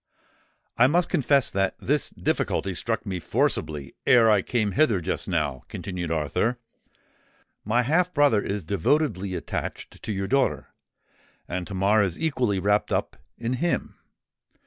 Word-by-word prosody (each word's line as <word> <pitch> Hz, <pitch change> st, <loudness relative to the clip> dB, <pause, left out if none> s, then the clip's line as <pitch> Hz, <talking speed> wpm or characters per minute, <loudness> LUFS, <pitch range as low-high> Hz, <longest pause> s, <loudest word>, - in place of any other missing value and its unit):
"I 125 Hz, -, +7 dB
must 170 Hz, +5 st, +2 dB
confess 140 Hz, -1 st, +2 dB
that 95 Hz, 0 st, 0 dB
this -, -, 0 dB
difficulty 95 Hz, -, -1 dB
struck 115 Hz, +6 st, -2 dB
me 95 Hz, -3 st, -3 dB
forcibly 75 Hz, -3 st, -1 dB
ere 115 Hz, -3 st, +6 dB
I 105 Hz, -2 st, +4 dB
came 110 Hz, -1 st, -1 dB
hither 120 Hz, -6 st, +3 dB
just 90 Hz, +2 st, -3 dB
now," 75 Hz, -8 st, -1 dB
continued 90 Hz, -3 st, -5 dB
Arthur. 80 Hz, -, 0 dB, 1.1 s
"My 120 Hz, +4 st, +2 dB
half 175 Hz, +7 st, +2 dB
brother 145 Hz, -9 st, +3 dB
is 100 Hz, -1 st, -3 dB
devotedly 100 Hz, -, 0 dB
attached 80 Hz, -4 st, -5 dB
to -, -, -4 dB
your 100 Hz, -1 st, -2 dB
daughter; 135 Hz, +6 st, 0 dB, 0.8 s
and 90 Hz, 0 st, -4 dB
Tamar 100 Hz, +2 st, +2 dB
is 95 Hz, -4 st, -1 dB
equally 130 Hz, -10 st, 0 dB
wrapped 105 Hz, +2 st, +1 dB
up -, -, -1 dB, 0.2 s
in 120 Hz, +1 st, -2 dB
him. 175 Hz, 0 st, -1 dB
105 Hz, 140 wpm, -25 LUFS, 90-125 Hz, 1.1 s, I